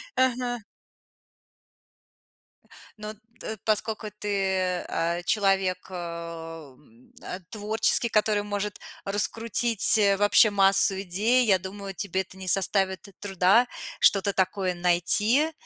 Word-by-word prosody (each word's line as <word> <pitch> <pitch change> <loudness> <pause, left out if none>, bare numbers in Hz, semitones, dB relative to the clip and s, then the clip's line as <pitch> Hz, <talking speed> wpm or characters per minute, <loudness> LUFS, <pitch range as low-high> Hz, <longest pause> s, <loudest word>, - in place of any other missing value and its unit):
Ага. 250 -2 0 2.4
Но 215 0 -7 0.3
т 220 - -6
поскольку 215 0 -1
ты, 190 -3 -1
а, 170 +1 -1
человек, 195 -2 +1
э, - - -10
м, 165 -7 -9
а, 180 - -6
творческий, 220 +2 +1
который 210 -1 +1
может 205 0 -4 0.3
раскрутить 220 +2 +1 0.2
вообще 205 +1 +5
массу 195 -1 +3
идей, 220 +7 +1
я 190 -4 +3
думаю, 195 +1 -7
тебе 190 0 -2
это 190 - -12
не 190 -1 -9
составит 190 +1 +1
труда 200 +4 +3 0.3
что-то 200 0 +3
такое 190 -1 0
найти 195 - +2
195 Hz, 105 wpm, -26 LUFS, 185-215 Hz, 2.4 s, вообще